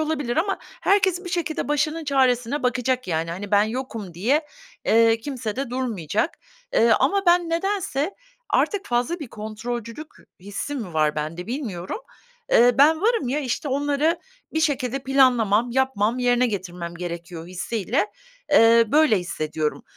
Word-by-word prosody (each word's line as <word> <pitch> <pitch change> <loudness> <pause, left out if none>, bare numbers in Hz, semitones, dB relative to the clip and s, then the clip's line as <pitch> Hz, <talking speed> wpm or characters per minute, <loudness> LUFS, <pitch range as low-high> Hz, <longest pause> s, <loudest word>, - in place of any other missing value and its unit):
olabilir 300 -5 -1
ama 390 +4 0 0.2
herkes 380 -2 +2
bir 355 - -6
şekilde 335 -4 -2
başının 305 +2 0
çaresine 260 -1 +1
bakacak, 250 -1 0
yani. 165 0 -1
Hani, 195 +4 -6
ben 205 0 +5
yokum 220 -5 -4
diye, 270 - +1 0.4
eee, 225 0 +4
kimse 240 -4 -4
de 270 -2 -3
durmayacak. 225 - -2 0.4
Eee, 230 - +4
ama 395 +1 +2
ben 345 -1 +4
nedense, 345 -2 -1 0.4
artık 405 -2 +1
fazla 250 +9 0
bir 290 - -6
kontrolcülük 230 +6 -6 0.3
hissim 205 +9 -5
mi 180 -6 -7
var 155 -1 +2
bende 155 +4 -4
bilmiyorum. 225 - -4 0.5
Eee, 245 +1 +6
ben 315 +3 +5
varım, 445 - +1
ya, 285 +4 0
işte, 275 +2 -3
onları 290 +4 +1 0.3
bir 315 - 0
şekilde 275 -4 0
planlamam, 245 -4 +3
yapmam, 245 -3 +1
yerine 245 0 +3
getirmem 180 -5 -5
gerekiyor 170 -1 -6
hissiyle, 200 +3 -1 0.5
eee, 230 0 +7
böyle 300 -9 +5
hissediyorum. 155 -3 -3
245 Hz, 140 wpm, -23 LUFS, 205-295 Hz, 0.5 s, eee